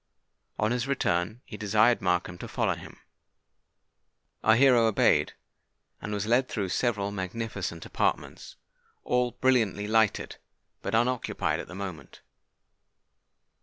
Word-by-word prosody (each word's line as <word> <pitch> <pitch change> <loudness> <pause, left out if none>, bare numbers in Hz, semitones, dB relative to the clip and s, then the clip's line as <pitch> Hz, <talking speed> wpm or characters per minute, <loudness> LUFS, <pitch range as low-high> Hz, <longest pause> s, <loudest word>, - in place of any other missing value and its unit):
On 105 +2 +1
his 125 +1 -1
return, 110 -4 -1
he 105 - -9
desired 110 +3 +3
Markham 90 -1 0
to - - -7
follow - - 0
him. - - -11 1.5
Our 110 - +5
hero 125 -2 +5
obeyed, 110 - +3 0.7
and 105 - -5
was 105 0 -2
led 120 +4 +2
through 100 -4 -2
several 100 -1 0
magnificent 95 -3 -4
apartments, - - -2 0.5
all 125 -1 +1
brilliantly 115 -6 +1
lighted, 110 -1 +1 0.4
but - - -2
unoccupied 120 +2 0
at - - -7
the 95 - -10
moment. 95 -4 -8
110 Hz, 120 wpm, -28 LUFS, 100-120 Hz, 1.5 s, Our